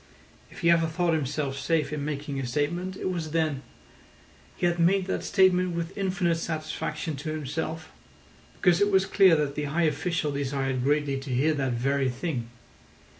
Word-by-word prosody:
If -, -, -12 dB
he 170 Hz, -1 st, +5 dB
ever 165 Hz, -1 st, +4 dB
thought 170 Hz, +1 st, 0 dB
himself 140 Hz, -2 st, -2 dB
safe 150 Hz, 0 st, 0 dB
in 150 Hz, -2 st, -3 dB
making 145 Hz, -1 st, -3 dB
a 130 Hz, -, -3 dB
statement, 175 Hz, +8 st, -2 dB
it 185 Hz, -, -2 dB
was 165 Hz, -3 st, -3 dB
then. 155 Hz, -4 st, 0 dB, 1.0 s
He -, -, 0 dB
had 175 Hz, 0 st, +1 dB
made 185 Hz, +3 st, +3 dB
that 190 Hz, -, -2 dB
statement 185 Hz, -3 st, +3 dB
with 170 Hz, +1 st, -4 dB
infinite 185 Hz, -4 st, 0 dB
satisfaction 155 Hz, -1 st, -3 dB
to 145 Hz, +3 st, -5 dB
himself, 155 Hz, +2 st, -4 dB, 0.7 s
because 180 Hz, +1 st, +4 dB
it 205 Hz, -, +4 dB
was 190 Hz, -1 st, +3 dB
clear 190 Hz, -4 st, +5 dB
that 150 Hz, -2 st, 0 dB
the 150 Hz, 0 st, -3 dB
high 160 Hz, +4 st, 0 dB
official 155 Hz, 0 st, 0 dB
desired 135 Hz, -2 st, -1 dB
greatly 145 Hz, -1 st, +1 dB
to 135 Hz, +1 st, -9 dB
hear 135 Hz, +5 st, +2 dB
that 135 Hz, -4 st, -1 dB
very 135 Hz, +2 st, +1 dB
thing. 125 Hz, -3 st, -3 dB
155 Hz, 175 wpm, -27 LUFS, 140-175 Hz, 1.0 s, he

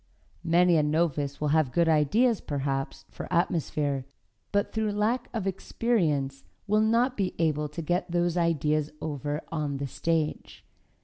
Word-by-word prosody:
Many 175 Hz, 0 st, +4 dB
a -, -, +4 dB
novice 150 Hz, -2 st, 0 dB
will 150 Hz, -, 0 dB
have 155 Hz, -3 st, +2 dB
good 170 Hz, +2 st, +2 dB
ideas, 195 Hz, -, +3 dB
perhaps, 135 Hz, -1 st, -3 dB
for -, -, -8 dB
atmosphere, 150 Hz, -5 st, 0 dB, 0.4 s
but 200 Hz, 0 st, 0 dB
through 220 Hz, -2 st, 0 dB
lack 225 Hz, +4 st, 0 dB
of 220 Hz, -4 st, -3 dB
experience 165 Hz, -, 0 dB, 0.2 s
will 210 Hz, +1 st, +3 dB
not 235 Hz, +4 st, +2 dB
be 190 Hz, -5 st, -1 dB
able 150 Hz, -2 st, 0 dB
to 165 Hz, +3 st, -6 dB
get 175 Hz, +4 st, -1 dB
those 175 Hz, 0 st, +1 dB
ideas 155 Hz, -3 st, +1 dB
over 145 Hz, 0 st, -3 dB
on 150 Hz, -4 st, -2 dB
the 140 Hz, -, -3 dB
stage. 155 Hz, +3 st, -2 dB
165 Hz, 145 wpm, -27 LUFS, 145-190 Hz, 0.4 s, Many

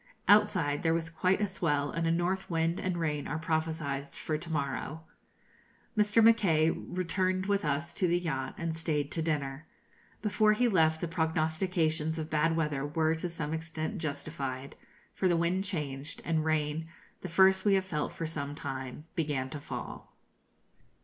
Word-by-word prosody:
Outside 180 Hz, -8 st, +4 dB
there 165 Hz, 0 st, +2 dB
was 165 Hz, -1 st, -2 dB
quite 185 Hz, +5 st, +1 dB
a -, -, +3 dB
swell, 150 Hz, -7 st, 0 dB
and 165 Hz, 0 st, -1 dB
a -, -, +3 dB
north 180 Hz, +3 st, 0 dB
wind 165 Hz, +1 st, +1 dB
and 185 Hz, -2 st, -1 dB
rain 150 Hz, -3 st, -1 dB
are 150 Hz, -, -2 dB
prophesied 160 Hz, -3 st, -1 dB
for 155 Hz, -, -4 dB
to 160 Hz, +2 st, -5 dB
morrow. 155 Hz, +2 st, -2 dB, 0.9 s
Mr. 210 Hz, +1 st, +4 dB
Mackay 180 Hz, -9 st, +5 dB
returned 185 Hz, +2 st, -1 dB
with 200 Hz, 0 st, +1 dB
us 150 Hz, +3 st, -1 dB
to 180 Hz, -, +1 dB
the 175 Hz, +1 st, +3 dB
yacht, 135 Hz, -7 st, -3 dB
and 165 Hz, -1 st, -2 dB
stayed 150 Hz, -3 st, -1 dB
to 165 Hz, -, -1 dB
dinner. 150 Hz, -2 st, -2 dB, 0.6 s
Before 215 Hz, 0 st, +4 dB
he 245 Hz, +3 st, +3 dB
left, 160 Hz, -6 st, +3 dB
the 175 Hz, -, -1 dB
prognostications 160 Hz, -1 st, 0 dB
of 155 Hz, -1 st, -4 dB
bad 160 Hz, +2 st, +2 dB
weather 150 Hz, -4 st, 0 dB
were 155 Hz, +2 st, +1 dB
to 165 Hz, +2 st, -3 dB
some 160 Hz, -2 st, -4 dB
extent 160 Hz, +3 st, -3 dB
justified; 140 Hz, -3 st, -4 dB, 0.4 s
for 190 Hz, -, +1 dB
the 175 Hz, -2 st, +3 dB
wind 175 Hz, +3 st, +1 dB
changed, 150 Hz, -5 st, -4 dB
and 160 Hz, -2 st, +1 dB
rain, 155 Hz, 0 st, 0 dB, 0.3 s
the 185 Hz, -, -5 dB
first 190 Hz, +3 st, +5 dB
we 200 Hz, -2 st, +4 dB
have 190 Hz, -1 st, +1 dB
felt 150 Hz, -5 st, -2 dB
for 165 Hz, -, -4 dB
some 145 Hz, -2 st, -4 dB
time, 135 Hz, 0 st, -5 dB
began 145 Hz, -6 st, -1 dB
to 150 Hz, -, -5 dB
fall. -, -, -7 dB
160 Hz, 170 wpm, -31 LUFS, 150-180 Hz, 0.9 s, Mackay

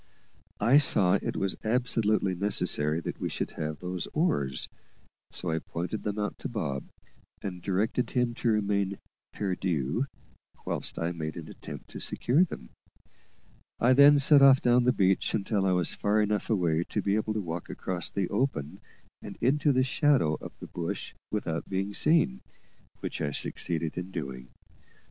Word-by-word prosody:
I 125 Hz, +7 st, +6 dB
saw 95 Hz, -10 st, +3 dB
it -, -, -3 dB
was 95 Hz, -1 st, -1 dB
absolutely 110 Hz, -4 st, +1 dB
necessary 85 Hz, -5 st, 0 dB
that -, -, -5 dB
we -, -, -1 dB
should -, -, -3 dB
have 75 Hz, -1 st, -4 dB
those 90 Hz, +3 st, -4 dB
oars, 70 Hz, -, 0 dB, 0.6 s
so 90 Hz, -, -3 dB
I 80 Hz, -, 0 dB
pointed 90 Hz, +7 st, -4 dB
them 105 Hz, 0 st, -3 dB
out 105 Hz, 0 st, -3 dB
to -, -, -4 dB
Bob, 80 Hz, -, -3 dB, 0.6 s
and 90 Hz, -2 st, -5 dB
directed 100 Hz, +7 st, 0 dB
him 125 Hz, -2 st, 0 dB
to -, -, 0 dB
remain 100 Hz, -2 st, +1 dB, 0.3 s
perdu, 90 Hz, -, -1 dB, 0.6 s
whilst -, -, -3 dB
I 85 Hz, +1 st, -1 dB
made 80 Hz, -2 st, -5 dB
an -, -, -7 dB
attempt -, -, -9 dB
to -, -, -7 dB
secure 140 Hz, +9 st, +2 dB
them. 65 Hz, -, -6 dB, 1.1 s
I 125 Hz, +2 st, +5 dB
then 140 Hz, +2 st, +8 dB
set 140 Hz, 0 st, +6 dB
off 135 Hz, -1 st, +8 dB
down 120 Hz, 0 st, +3 dB
the 125 Hz, -, +5 dB
beach 95 Hz, -4 st, +2 dB
until 100 Hz, -1 st, 0 dB
I -, -, +3 dB
was 90 Hz, -1 st, +2 dB
far 105 Hz, +1 st, +1 dB
enough 105 Hz, -1 st, 0 dB
away 85 Hz, -6 st, +2 dB
to 105 Hz, -, -2 dB
be 100 Hz, -, +1 dB
able 110 Hz, 0 st, -1 dB
to -, -, 0 dB
walk 85 Hz, -2 st, -5 dB
across 90 Hz, -1 st, -3 dB
the 95 Hz, -3 st, -1 dB
open 100 Hz, -, -1 dB, 0.4 s
and -, -, -9 dB
into 145 Hz, +4 st, +3 dB
the 130 Hz, -1 st, +3 dB
shadow 135 Hz, -, +2 dB
of -, -, -9 dB
the -, -, -8 dB
bush 85 Hz, -1 st, -5 dB, 0.2 s
without 85 Hz, -6 st, -3 dB
being 95 Hz, +1 st, -2 dB
seen, 125 Hz, -, +2 dB, 0.6 s
which -, -, -4 dB
I 75 Hz, -, 0 dB
succeeded 80 Hz, +3 st, -2 dB
in 90 Hz, +1 st, -6 dB
doing. 65 Hz, -8 st, -6 dB
100 Hz, 165 wpm, -28 LUFS, 85-120 Hz, 1.1 s, then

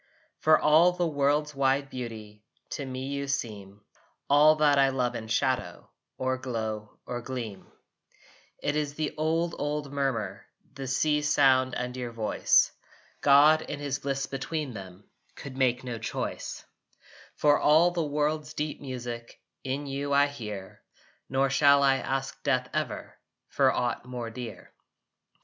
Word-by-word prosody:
For 155 Hz, 0 st, +5 dB
all 160 Hz, +4 st, +5 dB
the 175 Hz, 0 st, 0 dB
world's 150 Hz, 0 st, +1 dB
wide 135 Hz, 0 st, +1 dB
beauty 110 Hz, -4 st, -7 dB, 0.3 s
To 145 Hz, -, -3 dB
me 130 Hz, 0 st, -5 dB
you 140 Hz, 0 st, -3 dB
seem, 105 Hz, -7 st, -4 dB, 0.5 s
All 150 Hz, +2 st, +7 dB
that 150 Hz, -2 st, +4 dB
I 135 Hz, 0 st, +5 dB
love 125 Hz, -2 st, 0 dB
in 110 Hz, -, -6 dB
shadow 130 Hz, +3 st, -1 dB, 0.3 s
Or 130 Hz, 0 st, -1 dB
glow 110 Hz, -4 st, -4 dB
or 120 Hz, 0 st, -4 dB
gleam. 115 Hz, -6 st, -6 dB, 1.0 s
It 145 Hz, -, 0 dB
is 145 Hz, -1 st, -1 dB
the 155 Hz, -1 st, -2 dB
old 165 Hz, +2 st, 0 dB
old 145 Hz, -1 st, -3 dB
murmur, 130 Hz, -8 st, -2 dB, 0.3 s
The 135 Hz, -1 st, -6 dB
sea's 150 Hz, +3 st, +1 dB
sound 130 Hz, -2 st, +4 dB
and 125 Hz, 0 st, -3 dB
your 125 Hz, -2 st, -4 dB
voice. 110 Hz, -2 st, +3 dB, 0.5 s
God 145 Hz, +3 st, +6 dB
in 145 Hz, -, -5 dB
his 145 Hz, -1 st, -2 dB
Bliss 135 Hz, 0 st, -2 dB
between 140 Hz, 0 st, -4 dB
them 95 Hz, -2 st, -10 dB, 0.3 s
Could 135 Hz, -2 st, -9 dB
make 130 Hz, -1 st, +1 dB
no 120 Hz, -3 st, -5 dB
choice. 115 Hz, -, -5 dB, 0.7 s
For 145 Hz, -1 st, +4 dB
all 160 Hz, +4 st, +5 dB
the 175 Hz, -1 st, -1 dB
world's 150 Hz, +1 st, -1 dB
deep 150 Hz, 0 st, -3 dB
music 120 Hz, -3 st, -7 dB, 0.2 s
In 135 Hz, +2 st, -3 dB
you 140 Hz, +1 st, -3 dB
I 140 Hz, 0 st, +5 dB
hear: 105 Hz, -9 st, -7 dB, 0.5 s
Nor 135 Hz, 0 st, +1 dB
shall 140 Hz, +1 st, +5 dB
I 135 Hz, -1 st, +4 dB
ask 135 Hz, +1 st, -3 dB
death, 130 Hz, -3 st, +1 dB
ever, -, -, -4 dB, 0.3 s
For -, -, +3 dB
aught 120 Hz, -1 st, -1 dB
more 120 Hz, -2 st, -6 dB
dear. 115 Hz, -1 st, -8 dB
135 Hz, 145 wpm, -28 LUFS, 125-145 Hz, 1.0 s, All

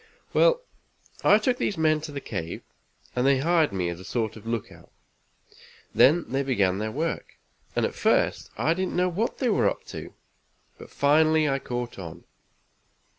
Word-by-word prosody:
"Well, -, -, +4 dB, 0.6 s
I 205 Hz, -, +7 dB
took 245 Hz, +3 st, 0 dB
these 200 Hz, -, -1 dB
men 155 Hz, -1 st, +2 dB
to 155 Hz, -1 st, -7 dB
the 140 Hz, -, -4 dB
cave, 85 Hz, -10 st, -5 dB, 0.5 s
and 125 Hz, -, +1 dB
they 140 Hz, -1 st, +5 dB
hired 160 Hz, -1 st, +2 dB
me 95 Hz, -3 st, -1 dB
as 85 Hz, 0 st, -6 dB
a -, -, -10 dB
sort 110 Hz, 0 st, -2 dB
of 110 Hz, 0 st, -11 dB
lookout. 115 Hz, -2 st, -5 dB, 1.0 s
Then 160 Hz, +6 st, +5 dB
they 135 Hz, +2 st, -1 dB
began 100 Hz, -9 st, +1 dB
their 110 Hz, +1 st, -2 dB
work, 160 Hz, +7 st, -3 dB, 0.4 s
and -, -, +2 dB
at -, -, -3 dB
first -, -, +1 dB
I 160 Hz, -, +2 dB
didn't 185 Hz, +1 st, -2 dB
know 180 Hz, 0 st, +2 dB
what 205 Hz, +7 st, -2 dB
they 255 Hz, -, 0 dB
were 210 Hz, -, +3 dB
up -, -, -6 dB
to, -, -, -8 dB, 0.6 s
but -, -, -11 dB
finally 155 Hz, +2 st, +3 dB
I 135 Hz, -1 st, +1 dB
caught 120 Hz, -4 st, -5 dB
on. 85 Hz, -4 st, -8 dB
145 Hz, 175 wpm, -26 LUFS, 115-170 Hz, 1.0 s, I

